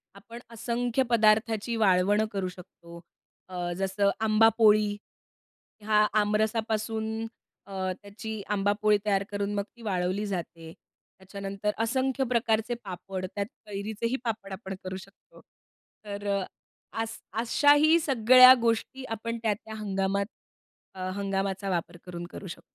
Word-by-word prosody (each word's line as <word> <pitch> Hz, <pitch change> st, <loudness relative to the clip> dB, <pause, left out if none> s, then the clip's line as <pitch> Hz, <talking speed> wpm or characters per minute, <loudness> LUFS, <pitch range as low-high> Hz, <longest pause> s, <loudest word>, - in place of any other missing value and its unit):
आपण 230 Hz, +4 st, -11 dB
असंख्य 235 Hz, +2 st, -1 dB
पदार्थाची 220 Hz, 0 st, +3 dB
वाळवण 205 Hz, 0 st, +3 dB
करू 195 Hz, -3 st, -2 dB
शकतो. 170 Hz, -1 st, -13 dB, 0.5 s
अ, 175 Hz, -1 st, -3 dB
जसं 195 Hz, +1 st, +1 dB
आंबा 220 Hz, 0 st, +5 dB
पोळी, 210 Hz, -2 st, +4 dB, 0.9 s
हा 210 Hz, 0 st, +4 dB, 0.2 s
आमरसापासून 220 Hz, +1 st, -1 dB, 0.4 s
अ, 190 Hz, -1 st, -3 dB
त्याची 215 Hz, +1 st, -7 dB
आंबापोळी 205 Hz, +1 st, +2 dB
तयार 200 Hz, -2 st, +2 dB
करून 200 Hz, 0 st, -2 dB
मग 200 Hz, -, 0 dB
ती 235 Hz, -, -17 dB
वाळवली 190 Hz, -1 st, -1 dB
जाते. 165 Hz, -4 st, -5 dB, 0.5 s
त्याच्यानंतर 200 Hz, +2 st, -4 dB
असंख्य 265 Hz, +3 st, 0 dB
प्रकारचे 230 Hz, -1 st, +1 dB
पापड. 185 Hz, 0 st, -6 dB
त्यात 200 Hz, -1 st, -1 dB, 0.2 s
कैरीचेही 215 Hz, +4 st, -3 dB
पापड 215 Hz, -4 st, -4 dB
आपण 190 Hz, -1 st, -6 dB
करू 185 Hz, 0 st, -5 dB
शकतो. 195 Hz, +2 st, -17 dB, 0.6 s
तर 205 Hz, 0 st, -6 dB, 0.7 s
अस 225 Hz, 0 st, -4 dB, 0.2 s
अशाही 290 Hz, +6 st, +5 dB
सगळ्या 255 Hz, -2 st, +8 dB
गोष्टी 235 Hz, +3 st, -1 dB
आपण 230 Hz, +1 st, -4 dB
त्या 220 Hz, -2 st, +2 dB
त्या 220 Hz, +2 st, -11 dB
हंगामात 200 Hz, -1 st, -1 dB, 0.7 s
अ, 185 Hz, -1 st, -4 dB
हंगामाचा 195 Hz, 0 st, -2 dB
वापर 175 Hz, -1 st, -2 dB
करून 175 Hz, -1 st, -6 dB
करू 195 Hz, -, -8 dB
शकतो. 170 Hz, 0 st, -8 dB
210 Hz, 120 wpm, -28 LUFS, 195-225 Hz, 0.9 s, सगळ्या